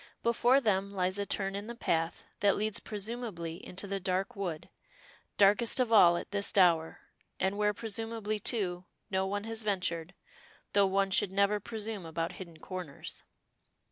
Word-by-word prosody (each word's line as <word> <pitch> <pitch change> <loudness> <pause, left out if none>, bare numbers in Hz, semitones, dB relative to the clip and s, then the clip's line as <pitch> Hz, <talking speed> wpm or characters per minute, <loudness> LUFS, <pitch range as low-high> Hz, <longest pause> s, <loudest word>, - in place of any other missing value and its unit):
Before 240 +3 +4
them 200 -5 +1
lies 185 0 -1
a 200 - -2
turn 195 -1 -1
in 200 +2 -5
the 235 - -6
path 165 -7 -1 0.2
that 200 -1 +4
leads 215 0 0
presumably 205 -6 -5
into 185 +3 -5
the 195 0 -2
dark 190 +5 -1
wood, 180 -6 -4 0.7
darkest 210 +5 +4
of 240 -3 +2
all 175 -5 +7
at - - -7
this 200 0 0
hour, 170 -4 +4 0.4
and 190 +1 +1
where 210 0 +2
presumably, 220 0 -3
too, 185 -6 -1 0.3
no 190 0 +1
one 205 +1 -2
has 225 0 -4
ventured, 180 -4 -2 0.6
though 200 -1 +5
one 195 0 +1
should 190 0 +3
never 200 +1 +2
presume 215 -2 -4
about 165 +1 -2
hidden 170 -4 -10
corners. 175 -4 -7
200 Hz, 160 wpm, -31 LUFS, 185-215 Hz, 0.7 s, all